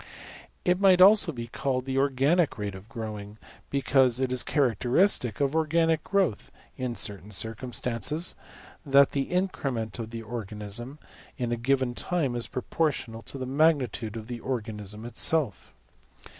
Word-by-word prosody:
It 180 0 +3
might 190 -2 +5
also 195 -1 +7
be 120 -5 -6
called 130 +2 -2
the 135 0 -2
\emph{organic 140 +5 +2
rate} 105 -2 -4
of 95 +4 -12
growing: 105 -3 -7 0.3
because 130 -3 +2
it 130 -1 0
is 125 -1 +2
characteristic 125 - +2
of 140 +1 +1
organic 160 0 +2
growth 190 - 0 0.3
(in 125 -2 -3
certain 100 -1 -3
circumstances) 120 - 0 0.5
that 140 -2 +5
the 140 -1 -2
increment 135 - -2
of 110 -1 -5
the 115 0 -7
organism 110 +3 -5 0.4
in 120 -2 -2
a - - +1
given 130 +1 0
time 145 -3 -1
is 120 - -1
proportional 130 -4 -2
to 135 - -7
the 130 - -4
magnitude 130 -6 +1
of 110 - -7
the 120 0 -6
organism 110 -4 -5
itself. 125 - -1
125 Hz, 145 wpm, -27 LUFS, 115-145 Hz, 0.5 s, also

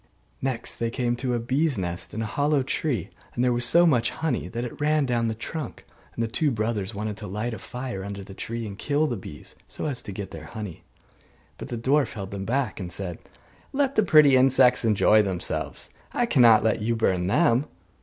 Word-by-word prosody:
Next 130 -3 -2
they 115 - -1
came 120 0 -1
to 125 -1 -1
a - - 0
bees' 135 +4 +1
nest 90 -1 -3
in 110 - -2
a - - -2
hollow 145 +4 +1
tree, 130 - -2 0.2
and 120 - +1
there 125 -1 +3
was 120 0 0
so 170 +8 +5
much 125 -8 +3
honey 155 -7 -2
that 120 +1 -4
it 120 +3 -7
ran 150 -1 +3
down 120 -2 0
the 110 - -2
trunk; 145 +4 -6 0.3
and 115 - -1
the - - 0
two 145 +7 +1
brothers 110 -4 -2
wanted 105 0 -3
to 105 - -7
light 105 +5 -3
a - - -6
fire 125 -6 -5
under 100 0 -6
the 95 - -11
tree 115 +3 -5
and 100 -1 -8
kill 145 +4 +1
the 125 - -1
bees, 75 -7 -10
so - - -5
as 135 -5 -2
to 100 - -8
get 95 -1 -6
their 80 -1 -8
honey. 105 -5 -7 0.8
But - - -6
the 120 - -3
dwarf 135 +5 +2
held 100 -4 -6
them 100 -1 -5
back, 125 -2 -1
and 90 -2 -5
said, 90 -2 -4 0.5
'Let 275 -1 +1
the 220 - +4
pretty 155 -8 +6
insects 130 -1 +5
enjoy 110 -1 +5
themselves, 95 -4 -3 0.2
I 245 - +2
cannot 120 - +6
let 110 0 +1
you 115 +2 0
burn 95 -5 +1
them. 130 - +3
115 Hz, 215 wpm, -25 LUFS, 105-135 Hz, 0.8 s, pretty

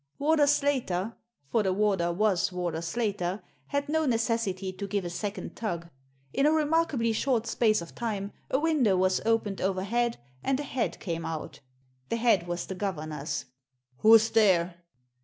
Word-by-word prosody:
Warder 295 0 +3
Slater 250 -9 +1 0.4
^for 230 - +4
the 190 -2 +1
warder 190 -3 +1
was 190 -1 +1
Warder 175 -3 -2
Slater 195 0 -2
— - - -32
^had 285 +1 0
no 315 0 +1
necessity 225 -5 0
to 200 +2 -5
give 200 -2 -1
a 175 - -4
second 200 +4 -5
tug. 170 -6 -4 0.4
In 280 - +3
a - - +5
remarkably 305 -7 +2
short 235 0 +1
space 215 -6 +2
of 170 - -12
time 205 -4 -3 0.2
a - - +2
window 290 - +3
was 185 0 +2
opened 220 -3 +1
overhead 205 +6 0 0.3
and 270 0 +1
a - - -2
head 260 -4 -2
came 165 -4 -3
out 160 -2 -5 0.5
The - - 0
head 225 -7 +2
was 175 0 -3
the - - -5
governor's. 155 -7 -3 0.5
"Who's 225 - +6
there?" 180 -5 +3
210 Hz, 160 wpm, -28 LUFS, 180-240 Hz, 0.5 s, Who's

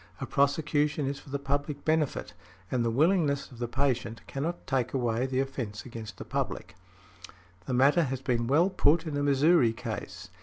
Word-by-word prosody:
A - - -3
prosecution 145 +1 +1
is 140 +1 -3
for - - -15
the 140 - -1
public 140 +1 -3
benefit, 155 -3 0 0.4
and 125 -2 +1
the 115 - +1
willingness 145 +2 +2
of 120 - -13
the 120 - -2
patient 125 -3 -1
cannot 160 +6 -4
take 135 -1 -1
away 120 0 0
the 130 0 -1
offence 125 -6 -5
against 115 -3 -8
the - - -8
public". 110 -7 -3 0.9
The 130 - -1
matter 140 +6 +4
has 135 -1 -3
been 120 -3 0
well 165 +9 +3
put 165 -2 +3
in 155 -3 -3
a 145 - 0
Missouri 145 -2 +4
case. 95 -6 -6
135 Hz, 180 wpm, -29 LUFS, 120-145 Hz, 0.9 s, matter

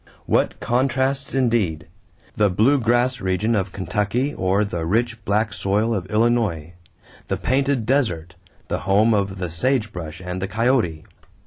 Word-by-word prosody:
What - - +1
contrasts 135 +2 0
indeed! 110 - +1 0.5
The 105 -3 +3
blue 115 +10 +3
grass 120 +1 +1
region 95 +4 0
of 100 -3 0
Kentucky 105 +8 -1
or 95 +3 +1
the 85 -5 -4
rich, 115 +5 -1
black 105 +1 +1
soil 105 +5 0
of 95 -4 -3
Illinois 105 -8 0 0.5
the - - -1
painted 135 -2 0
desert, 100 - 0 0.3
the - - -2
home 105 +4 +3
of 100 -2 0
the 90 -3 -4
sage 115 +4 0
brush 80 -3 -7
and 90 0 -5
the 95 - -1
coyote! 110 -8 0
105 Hz, 145 wpm, -22 LUFS, 95-120 Hz, 0.5 s, The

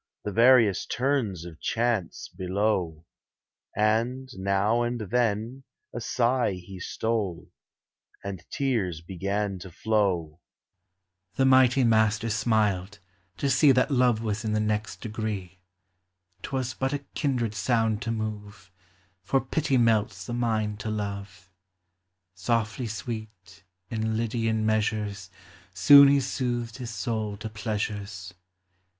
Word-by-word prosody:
The 105 - -3
various 115 -3 +5
turns 120 - -1
of 85 -2 -10
chance 115 -6 -1
below; 90 -3 -1 0.7
And, 115 +5 0
now 100 +4 +1
and 120 0 -1
then, 115 +3 -1 0.3
a 120 - -4
sigh 120 -1 +1
he 90 +1 -9
stole 105 -3 -3 0.3
/ - - -37
And 95 -3 -6
tears 110 - -1
began 100 +3 -3
to 95 +1 -9
flow 90 -5 0 1.0
The 135 - +2
mighty 130 0 +5
master 110 -1 +2
smiled, 105 -3 0 0.4
to 140 - -1
see 135 +2 +5
That 125 +3 +2
love 125 -4 +3
was 110 0 -2
in 110 -1 -1
the 110 - +1
next 105 0 -2
degree; 105 -5 -5 0.8
'T - - -7
was 130 -2 -2
but 135 +1 -2
a 145 -1 -4
kindred 125 -7 -1
sound 110 0 +1
to 115 - -2
move, 105 -4 -6 0.5
For 105 +8 +1
pity 140 -1 0
melts 110 -5 +1
the 120 - -5
mind 110 -3 -1
to 110 - -4
love. 100 -3 -5 0.8
Softly 115 +5 -1
sweet, 105 -3 -7 0.3
in 110 0 -1
Lydian 115 -1 0
measures, 105 -3 -1 0.5
Soon 140 +10 +9
lie 140 - +5
soothed 125 -3 -2
his 125 -3 -6
soul 110 -3 -3
to 110 +1 -6
pleasures. 105 -4 -4
110 Hz, 125 wpm, -27 LUFS, 100-120 Hz, 1.0 s, Soon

